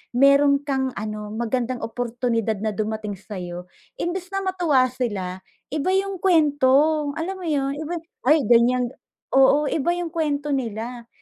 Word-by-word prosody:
meron 280 Hz, +1 st, +5 dB
kang 265 Hz, -2 st, -1 dB
ano, 210 Hz, 0 st, -5 dB
magandang 240 Hz, +2 st, -2 dB
oportunidad 230 Hz, -2 st, -1 dB
na 215 Hz, -1 st, 0 dB
dumating 215 Hz, -1 st, -3 dB
sa'yo, 180 Hz, -3 st, -7 dB, 0.3 s
imbes 360 Hz, +1 st, -3 dB
na 390 Hz, 0 st, -1 dB
matuwa 325 Hz, -9 st, +2 dB
sila, 195 Hz, -8 st, -3 dB, 0.3 s
iba 305 Hz, +4 st, -1 dB
yung 390 Hz, -1 st, -1 dB
kuwento. 300 Hz, -3 st, +3 dB
Alam 380 Hz, +4 st, -3 dB
mo 345 Hz, -, -5 dB
yun, 275 Hz, -2 st, 0 dB
iba 320 Hz, +3 st, -4 dB, 0.3 s
ay, 300 Hz, 0 st, +5 dB
ganiyan. 245 Hz, +1 st, +4 dB, 0.4 s
Oo, 275 Hz, +2 st, +5 dB
iba 320 Hz, +3 st, +1 dB
yung 345 Hz, -2 st, -4 dB
kuwento 295 Hz, -3 st, -1 dB
nila. 235 Hz, -1 st, -3 dB
265 Hz, 140 wpm, -23 LUFS, 225-305 Hz, 0.4 s, meron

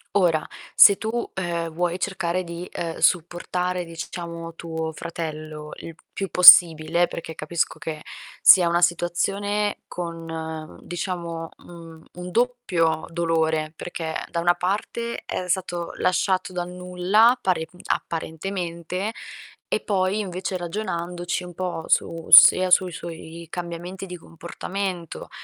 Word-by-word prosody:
Ora, 170 Hz, -6 st, +2 dB, 0.3 s
se 200 Hz, -2 st, +8 dB
tu, 230 Hz, +2 st, -3 dB
ehm, 170 Hz, -3 st, -2 dB
vuoi 175 Hz, +2 st, -1 dB
cercare 185 Hz, -2 st, -2 dB
di, 170 Hz, +1 st, -7 dB
ehm, 165 Hz, -1 st, -5 dB
supportare, 180 Hz, +1 st, 0 dB
diciamo, 165 Hz, 0 st, -7 dB
tuo 160 Hz, -1 st, -4 dB
fratello 155 Hz, -2 st, -7 dB
il 165 Hz, -, -9 dB, 0.2 s
più 195 Hz, -1 st, -4 dB
possibile, 170 Hz, -1 st, +8 dB
perché 165 Hz, -1 st, -7 dB
capisco 160 Hz, +2 st, -2 dB
che 155 Hz, -1 st, -6 dB, 0.4 s
sia 180 Hz, -2 st, +8 dB
una 170 Hz, +1 st, +1 dB
situazione 200 Hz, +4 st, 0 dB
con, 170 Hz, -2 st, -6 dB
mhmm, 160 Hz, -1 st, -7 dB
diciamo, 170 Hz, -2 st, -5 dB
mhmm, 165 Hz, -2 st, -13 dB
un 180 Hz, 0 st, -7 dB
doppio 195 Hz, -10 st, 0 dB
dolore, 160 Hz, -2 st, 0 dB
perché 160 Hz, -1 st, -6 dB, 0.2 s
da 170 Hz, -, -2 dB
una 175 Hz, +1 st, +4 dB
parte 215 Hz, +5 st, -3 dB
è 180 Hz, -, -4 dB
stato 175 Hz, -2 st, -2 dB
lasciato 185 Hz, +1 st, 0 dB
dal 175 Hz, -1 st, -4 dB
nulla, 180 Hz, +7 st, +2 dB
pare, 175 Hz, -4 st, 0 dB
mhmm, 180 Hz, -, -19 dB
apparentemente, 175 Hz, +3 st, -4 dB, 0.6 s
e -, -, +2 dB
poi 195 Hz, 0 st, 0 dB
invece 185 Hz, -1 st, -3 dB
ragionandoci 175 Hz, -1 st, -4 dB
un 175 Hz, -, -10 dB
po' 175 Hz, -2 st, -4 dB
su 165 Hz, -1 st, 0 dB
sia 185 Hz, +2 st, +9 dB
sui 180 Hz, 0 st, +4 dB
suoi 170 Hz, -1 st, -9 dB
cambiamenti 175 Hz, +2 st, -6 dB
di 180 Hz, -1 st, -8 dB
comportamento 175 Hz, +1 st, -6 dB
175 Hz, 125 wpm, -23 LUFS, 165-185 Hz, 0.6 s, sia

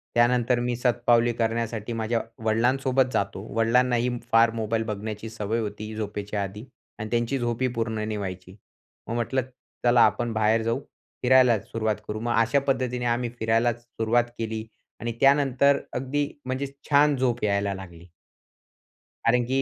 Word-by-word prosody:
त्यानंतर 120 Hz, 0 st, +3 dB
मी 120 Hz, -, 0 dB
शतपावली 120 Hz, -1 st, +3 dB
करण्यासाठी 115 Hz, 0 st, -1 dB
माझ्या 115 Hz, +1 st, 0 dB, 0.2 s
वडिलांसोबत 130 Hz, +3 st, +2 dB
जातो. 100 Hz, -1 st, -1 dB, 0.2 s
वडिलांनाही 120 Hz, +1 st, +3 dB, 0.2 s
फार 115 Hz, 0 st, +5 dB
मोबाईल 110 Hz, +1 st, 0 dB
बघण्याची 105 Hz, +1 st, -5 dB
सवय 110 Hz, +1 st, -2 dB
होती, 105 Hz, 0 st, -5 dB
झोपेच्या 105 Hz, -1 st, -3 dB
आधी 100 Hz, +3 st, -7 dB, 0.4 s
आणि 110 Hz, 0 st, -4 dB
त्यांची 120 Hz, +3 st, 0 dB
झोपही 120 Hz, +1 st, 0 dB
पूर्ण 115 Hz, -1 st, -1 dB
नाही 110 Hz, -1 st, -3 dB
व्हायची, 95 Hz, -2 st, -6 dB, 0.5 s
मग 115 Hz, -, -3 dB
म्हटलं, 120 Hz, +3 st, 0 dB, 0.4 s
"चला, 120 Hz, 0 st, +5 dB
आपण 120 Hz, -1 st, 0 dB
बाहेर 110 Hz, +1 st, +2 dB
जाऊ, 115 Hz, +1 st, 0 dB, 0.4 s
फिरायलाच 125 Hz, -3 st, +4 dB
सुरुवात 110 Hz, -2 st, 0 dB
करू." 105 Hz, +1 st, -3 dB
मग 120 Hz, +1 st, -1 dB
अशा 115 Hz, +5 st, +2 dB
पद्धतीने 125 Hz, -2 st, -2 dB
आम्ही 120 Hz, 0 st, 0 dB
फिरायलाच 115 Hz, +1 st, +1 dB
सुरुवात 120 Hz, +1 st, 0 dB
केली 110 Hz, -1 st, -3 dB, 0.3 s
आणि 120 Hz, +1 st, -3 dB
त्यानंतर 140 Hz, 0 st, +4 dB
अगदी 140 Hz, +3 st, -1 dB, 0.2 s
म्हणजे 130 Hz, +2 st, -2 dB, 0.2 s
छान 145 Hz, 0 st, +5 dB
झोप 125 Hz, -4 st, 0 dB
यायला 100 Hz, -1 st, +1 dB
लागली. 85 Hz, -3 st, -11 dB, 1.2 s
कारण 120 Hz, +1 st, +4 dB
की 135 Hz, +2 st, +1 dB
115 Hz, 145 wpm, -25 LUFS, 110-125 Hz, 1.2 s, फार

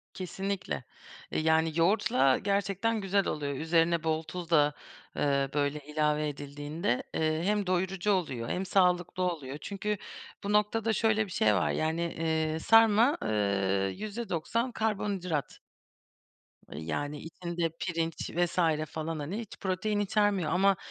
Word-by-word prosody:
Kesinlikle. 190 Hz, -, -4 dB, 0.5 s
Eee, -, -, 0 dB
yani 160 Hz, +1 st, +3 dB
yoğurtla 195 Hz, -, +3 dB
gerçekten 200 Hz, +2 st, 0 dB
güzel 195 Hz, 0 st, +1 dB
oluyor. 145 Hz, -2 st, -2 dB
Üzerine 165 Hz, +2 st, +2 dB
bol 160 Hz, 0 st, 0 dB
tuz 175 Hz, +1 st, -7 dB
da, 150 Hz, -3 st, +4 dB, 0.4 s
eee, 140 Hz, -1 st, +1 dB
böyle, 145 Hz, 0 st, 0 dB
ilave 150 Hz, +1 st, 0 dB
edildiğinde, 145 Hz, -1 st, -3 dB
eee, 155 Hz, 0 st, 0 dB
hem 205 Hz, 0 st, +1 dB
doyurucu 185 Hz, +2 st, 0 dB
oluyor, 135 Hz, -12 st, -1 dB
hem 190 Hz, -, -1 dB
sağlıklı 180 Hz, -1 st, +2 dB
oluyor. 150 Hz, -6 st, -3 dB
Çünkü 210 Hz, +1 st, -3 dB, 0.5 s
bu 200 Hz, +1 st, -1 dB
noktada 215 Hz, +2 st, +2 dB
şöyle 220 Hz, 0 st, +2 dB
bir 195 Hz, -, -11 dB
şey 105 Hz, -10 st, +3 dB
var, -, -, +1 dB
yani, 160 Hz, +2 st, -1 dB
eee, 160 Hz, -1 st, -1 dB
sarma, 225 Hz, -, +5 dB
eee, 100 Hz, -3 st, 0 dB
%90 215 Hz, +2 st, -2 dB
karbonhidrat. 195 Hz, -, -2 dB, 1.1 s
Eee, 75 Hz, -, -7 dB
yani, 145 Hz, -, -3 dB
içinde 170 Hz, +1 st, -3 dB
pirinç 165 Hz, -2 st, -2 dB
vs. 165 Hz, -2 st, +1 dB
falan, 160 Hz, 0 st, -3 dB
hani, 165 Hz, +9 st, -4 dB
hiç 225 Hz, -4 st, -8 dB
protein 200 Hz, +2 st, -1 dB
içermiyor 205 Hz, -5 st, +1 dB
ama 195 Hz, +2 st, +4 dB
170 Hz, 130 wpm, -30 LUFS, 150-200 Hz, 1.1 s, sarma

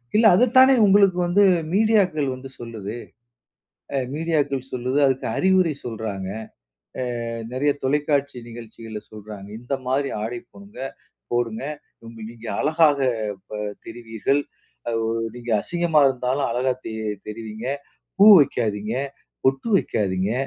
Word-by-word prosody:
இல்ல. 220 Hz, +2 st, +5 dB
அத 220 Hz, -, +4 dB
தானே 260 Hz, +1 st, +8 dB
உங்களுக்கு 195 Hz, -2 st, +5 dB
வந்து 195 Hz, +4 st, +4 dB, 0.3 s
மீடியாக்கள் 195 Hz, -8 st, +3 dB
வந்து 130 Hz, +1 st, -10 dB
சொல்லுது. 115 Hz, -3 st, -6 dB, 1.0 s
அ -, -, +2 dB, 0.2 s
மீடியாக்கள் 145 Hz, -5 st, -1 dB
சொல்லுது, 130 Hz, +2 st, -1 dB
அதுக்கு 130 Hz, -1 st, 0 dB
அறிவுரை 185 Hz, -3 st, +3 dB
சொல்றாங்க. 110 Hz, -5 st, -4 dB, 1.0 s
அ -, -, -4 dB, 0.2 s
நிறைய 140 Hz, +3 st, +1 dB
தொலைக்காட்சி 140 Hz, 0 st, 0 dB
நிகழ்ச்சிகள்ல 115 Hz, -1 st, -9 dB
சொல்றாங்க. 105 Hz, -2 st, -10 dB
இந்தமாரி 135 Hz, +2 st, -2 dB
ஆடை 120 Hz, +3 st, -3 dB
போடுங்க! 200 Hz, +1 st, -14 dB, 0.5 s
போடுங்க! 120 Hz, -1 st, -1 dB, 0.7 s
நீங்க 115 Hz, 0 st, -11 dB
அழகாக 155 Hz, -1 st, +3 dB, 0.5 s
ப 105 Hz, -1 st, -5 dB, 0.3 s
தெரிவீர்கள். 115 Hz, +4 st, -1 dB, 0.5 s
அ -, -, -1 dB, 0.4 s
நீங்க 120 Hz, 0 st, -8 dB
அசிங்கமா 170 Hz, 0 st, +2 dB
இருந்தாலும் 130 Hz, +2 st, -1 dB
அழகா 125 Hz, +2 st, +1 dB
தெ 110 Hz, -, -5 dB, 0.4 s
தெரிவீங்க. 110 Hz, +1 st, -7 dB, 0.5 s
பூ 200 Hz, -, +8 dB
வைக்காதீங்க. 110 Hz, -5 st, 0 dB, 0.5 s
பொட்டு 135 Hz, +10 st, +1 dB
வைக்காதீங்க. 95 Hz, -, 0 dB
130 Hz, 110 wpm, -23 LUFS, 115-155 Hz, 1.0 s, தானே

